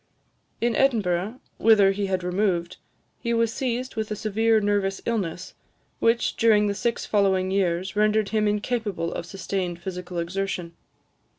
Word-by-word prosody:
In 235 -1 +1
Edinburgh, 215 -4 +1 0.2
whither 210 -3 +6
he 200 0 -2
had 185 -1 -1
removed, 180 -1 0 0.4
he 235 0 -1
was 230 -1 +1
seized 255 -1 -2
with 220 -1 -2
a 210 - -2
severe 220 +2 +2
nervous 205 -2 0
illness, 190 -5 -3 0.5
which, 230 +1 +2
during 215 -2 +4
the 205 - 0
six 235 +3 -2
following 190 -2 +2
years, 190 0 0
rendered 210 0 +2
him 215 -1 +1
incapable 210 -4 -1
of 170 - -5
sustained 185 -2 -3
physical 180 0 -6
exertion. 180 0 -3
200 Hz, 140 wpm, -25 LUFS, 185-220 Hz, 0.5 s, whither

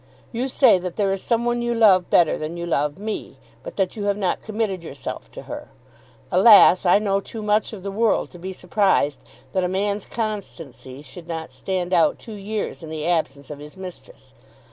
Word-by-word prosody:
You 245 +3 -2
say 260 -7 +5
that 180 -1 -5
there 200 -2 +1
is 195 -1 -2
some 235 0 0
one 240 0 0
you 240 0 -1
love 195 -6 +5
better 170 -3 +4
than 155 +2 -5
you 170 - -4
love 150 -3 0
me, 215 +2 -5 0.2
but - - -9
that 190 -2 0
you 205 -2 -4
have 200 0 +1
not 190 -3 -1
committed 215 -5 -3
yourself 140 -4 -7
to - - -10
her. - - -7 0.6
Alas, 190 -1 +7
I 175 - +6
know 200 -1 +1
too 215 +2 -8
much 210 0 +1
of 205 -5 -9
the 200 - -4
world 220 +2 +1
to 175 - -12
be 190 +2 -5
surprised 180 -6 +1 0.3
that 185 - +1
a - - +1
man's 200 +2 -1
constancy 165 - -6
should 160 +5 -11
not 160 -4 -5
stand 180 +6 -3
out 170 -2 +4
two 225 - -10
years 210 0 -4
in 160 - -8
the 155 -1 -4
absence 145 -5 -1
of 145 - -7
his 150 +5 -11
mistress. 190 - -11
190 Hz, 205 wpm, -22 LUFS, 170-210 Hz, 0.6 s, Alas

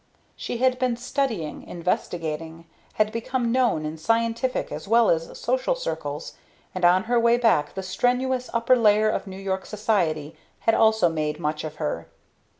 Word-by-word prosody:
She - - -4
had 255 +1 +2
been 250 -2 0
studying, 235 - -2
investigating, 165 -2 -3 0.3
had 215 0 +1
become 235 +1 -1
known 240 -11 +2
in 155 +1 -5
scientific 230 +6 0
as - - -6
well 230 +1 +5
as 165 0 -2
social 260 - 0
circles, 160 - -5 0.4
and 185 - -5
on 180 +2 +5
her 240 +2 +2
way 235 +1 +4
back 225 -11 +2
the 190 - -4
strenuous 250 +6 0
upper 235 +2 +3
layer 215 -2 +4
of - - -3
New 190 0 -8
York 190 -1 -3
Society 170 -8 -1 0.3
had 225 - +3
also 220 -5 +4
made 155 -2 -2
much 150 -1 -2
of 155 -1 -6
her. 150 - -3
210 Hz, 160 wpm, -24 LUFS, 160-240 Hz, 0.4 s, well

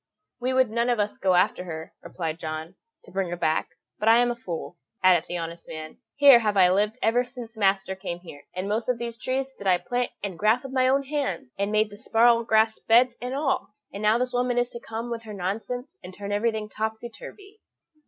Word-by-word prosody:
"We 250 +1 -1
would 260 -3 +3
none 235 +2 +1
of 240 -2 +1
us 205 0 -1
go 185 -1 +3
after 180 0 +2
her," 160 -2 -7
replied 165 -2 -5
John, 155 +2 -5 0.3
"to - - -16
bring 190 -1 -1
her 175 - -4
back; 155 -2 0 0.3
but 215 - +3
I 225 - +7
am 240 0 +3
a - - -3
fool," 175 -5 -6 0.2
added 180 -3 +5
the 175 - -3
honest 170 0 -6
man; 155 0 -8 0.2
"here 280 -4 +8
have 210 -3 0
I 180 -1 +6
lived 210 +4 +1
ever 235 +3 +3
since 245 -2 -10
master 195 -2 +1
came 190 -2 -5
here, 145 -5 -12
and 185 +2 -3
most 220 +4 -1
of 250 - +2
these 235 0 -5
trees 265 +3 -2
did 200 - -6
I 185 -1 +5
plant 245 +6 -2
and 190 -5 -4
graff 220 +5 +3
with 270 -1 -8
my 255 -1 +3
own 275 +2 +3
hands, 270 - -3
and 200 +1 -1
made 215 0 +2
the 205 - -12
sparrow 230 +1 +4
grass 220 -1 +3
beds 240 +2 +4
and 250 +2 -3
all, 275 -7 -1 0.2
and 200 - -6
now 215 +2 +4
this 250 +1 -1
woman 245 0 +1
is 245 0 +1
to 235 - -7
come 230 +1 -6
with 230 -1 -3
her 215 -2 -9
nonsense, 225 - -4
and - - -8
turn 200 +2 -7
everything 215 +1 0
topsy 220 +2 -4
turvy." 410 - -13
220 Hz, 230 wpm, -26 LUFS, 190-245 Hz, 0.3 s, here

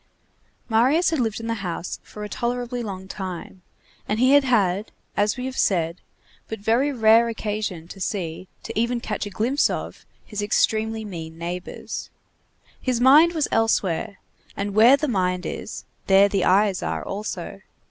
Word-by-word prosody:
Marius 260 +11 +3
had 320 - 0
lived 225 -3 -1
in 225 - -7
the 230 - -1
house 175 -1 -4
for 210 - -10
a - - -4
tolerably 245 +2 -3
long 190 -4 -6
time, 185 -1 -7 0.5
and 210 +1 0
he 255 +2 +5
had 285 0 +6
had, 210 -5 +1 0.2
as 205 +4 +1
we 250 - -4
have 260 0 -4
said, 170 -2 +1 0.5
but 220 - -5
very 230 +8 +1
rare 230 -2 +5
occasion 210 -6 -4
to 195 - -10
see, 185 -2 -3 0.2
to - - -6
even 235 +1 +1
catch 220 - -3
a - - -6
glimpse 240 +8 +1
of, - - -5 0.2
his 210 -1 -5
extremely 220 +1 +1
mean 165 -5 -7
neighbors. 175 +2 -6 0.7
His 250 -3 0
mind 295 +7 +7
was 310 -3 0
elsewhere, 205 -3 +1 0.4
and 200 0 -2
where 230 +6 +7
the 300 +2 -1
mind 180 -6 0
is, - - -6 0.2
there 195 +1 +6
the 195 -2 0
eyes 195 0 +3
are - - -3
also. 210 +2 -5
215 Hz, 165 wpm, -23 LUFS, 190-240 Hz, 0.7 s, mind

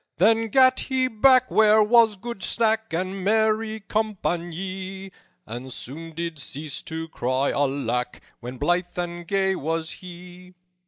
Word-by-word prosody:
"Then 225 +5 +3
gat 260 +3 +5
he 260 -1 0
back 255 +2 +4
where 215 0 +5
was 225 0 +5
good 220 +1 -7
sack 220 +2 +1
And 185 +3 -3
merry 220 +1 +1
com 215 +2 -1
panye, 190 +2 -4 0.3
And 120 +4 -7
soon 160 +7 -8
did 165 -2 -4
cease 150 +2 -5
to 160 0 -6
cry 130 -1 0
'Alack!' 130 -3 -1 0.2
When 125 +2 -8
blithe 175 +6 0
and 175 -1 -4
gay 190 0 +1
was 160 0 -3
he. 180 0 -12
185 Hz, 140 wpm, -24 LUFS, 160-220 Hz, 0.3 s, gat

